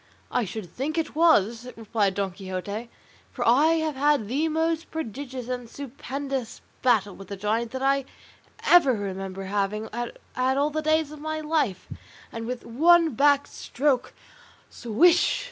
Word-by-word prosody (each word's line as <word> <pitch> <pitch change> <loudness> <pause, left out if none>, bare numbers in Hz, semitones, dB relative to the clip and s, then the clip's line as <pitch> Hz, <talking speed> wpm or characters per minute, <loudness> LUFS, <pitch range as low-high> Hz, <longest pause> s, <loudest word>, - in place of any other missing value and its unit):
"I 245 - +1
should 210 +2 -6
think 270 - -4
it 325 - -1
was," 245 - +3
replied 210 -3 0
Don 195 -1 -1
Quixote, 195 +4 -5 0.4
"for - - -2
I 290 +8 +5
have 310 -2 -2
had 285 -5 +2
the 285 +8 0
most 325 +1 -1
prodigious 260 -3 -5
and 245 -2 -4
stupendous 275 -1 -5 0.2
battle 210 -6 +2
with 195 - -11
the 200 - -5
giant 220 +4 -1
that 260 +2 -5
I 275 0 +2 0.6
ever 335 -7 +6
remember 195 -1 -5
having 205 +2 -2
had 240 +1 -4 0.4
all 290 +2 +2
the 310 +1 -1
days 310 -1 +1
of 305 - -10
my 310 +1 -3
life; 300 - -1 0.4
and 230 0 -6
with 250 0 -5
one 330 +7 +4
back 285 +3 +4
stroke 265 -1 -1 0.6
swish! 330 +10 +3
250 Hz, 150 wpm, -25 LUFS, 215-300 Hz, 0.6 s, ever